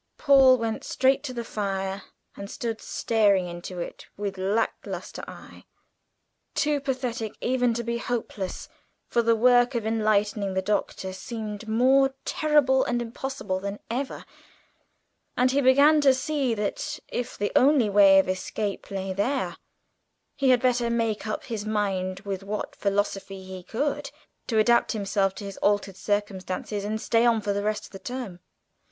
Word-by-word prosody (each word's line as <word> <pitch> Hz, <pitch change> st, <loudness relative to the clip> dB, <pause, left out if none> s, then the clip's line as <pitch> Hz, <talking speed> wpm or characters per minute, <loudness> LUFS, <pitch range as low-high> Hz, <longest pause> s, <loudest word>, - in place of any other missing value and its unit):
Paul 270 Hz, -3 st, +6 dB
went 225 Hz, -2 st, -3 dB
straight 265 Hz, +1 st, +2 dB
to 265 Hz, -, -4 dB
the 235 Hz, -1 st, -4 dB
fire, 195 Hz, -3 st, -3 dB, 0.3 s
and 200 Hz, 0 st, -8 dB
stood 225 Hz, -1 st, -4 dB
staring 205 Hz, -5 st, +2 dB
into 175 Hz, +1 st, -7 dB
it 170 Hz, -, -7 dB
with 200 Hz, -1 st, -3 dB
lack 200 Hz, +4 st, +1 dB
lustre -, -, -7 dB
eye, -, -, -12 dB, 0.9 s
too 300 Hz, -1 st, +2 dB
apathetic 255 Hz, -5 st, -3 dB
even 245 Hz, -2 st, +1 dB
to 235 Hz, -, -2 dB
be 235 Hz, 0 st, -2 dB
hopeless, 220 Hz, -6 st, -4 dB, 0.4 s
for 235 Hz, -, +2 dB
the 230 Hz, 0 st, +3 dB
work 245 Hz, +2 st, +4 dB
of 230 Hz, -2 st, -1 dB
enlightening 210 Hz, -3 st, +1 dB
the 190 Hz, -, +1 dB
Doctor 195 Hz, -2 st, -2 dB
seemed 215 Hz, +2 st, -6 dB
more 265 Hz, +4 st, +3 dB
terrible 290 Hz, -4 st, +3 dB
and 240 Hz, 0 st, -1 dB
impossible 235 Hz, -4 st, -4 dB
than 200 Hz, +1 st, -4 dB
ever, 265 Hz, +3 st, -3 dB, 1.1 s
and 255 Hz, +1 st, +3 dB
he 280 Hz, +2 st, +2 dB
began 285 Hz, +4 st, +6 dB
to 270 Hz, -2 st, +5 dB
see 265 Hz, -3 st, -1 dB
that, 215 Hz, +8 st, -3 dB
if 245 Hz, +1 st, -4 dB
the 205 Hz, -, -1 dB
only 270 Hz, -4 st, +5 dB
way 200 Hz, -1 st, +6 dB
of 190 Hz, -, +4 dB
escape 195 Hz, +2 st, -3 dB
lay 195 Hz, -1 st, -3 dB
there, 255 Hz, +8 st, -1 dB, 0.8 s
he 275 Hz, -2 st, +2 dB
had 250 Hz, -1 st, +4 dB
better 245 Hz, -2 st, +2 dB
make 225 Hz, -2 st, -1 dB
up 215 Hz, -, -3 dB
his 225 Hz, -5 st, -4 dB
mind 195 Hz, -3 st, -1 dB
with 200 Hz, -2 st, -4 dB
what 205 Hz, +2 st, -5 dB
philosophy 195 Hz, -1 st, -2 dB
he 185 Hz, 0 st, -8 dB
could 280 Hz, +8 st, -2 dB, 0.4 s
to 225 Hz, -, 0 dB
adapt 235 Hz, +3 st, +4 dB
himself 195 Hz, -2 st, 0 dB
to -, -, -8 dB
his 195 Hz, -1 st, -7 dB
altered 205 Hz, -2 st, +1 dB
circumstances, 205 Hz, 0 st, -2 dB
and 215 Hz, +2 st, -2 dB
stay 230 Hz, 0 st, +2 dB
on 235 Hz, -2 st, +4 dB
for 205 Hz, -1 st, -1 dB
the 200 Hz, -, -1 dB
rest 210 Hz, +1 st, -2 dB
of -, -, -15 dB
the 195 Hz, -, -9 dB
term. 245 Hz, -8 st, -6 dB
220 Hz, 160 wpm, -26 LUFS, 200-250 Hz, 1.1 s, Paul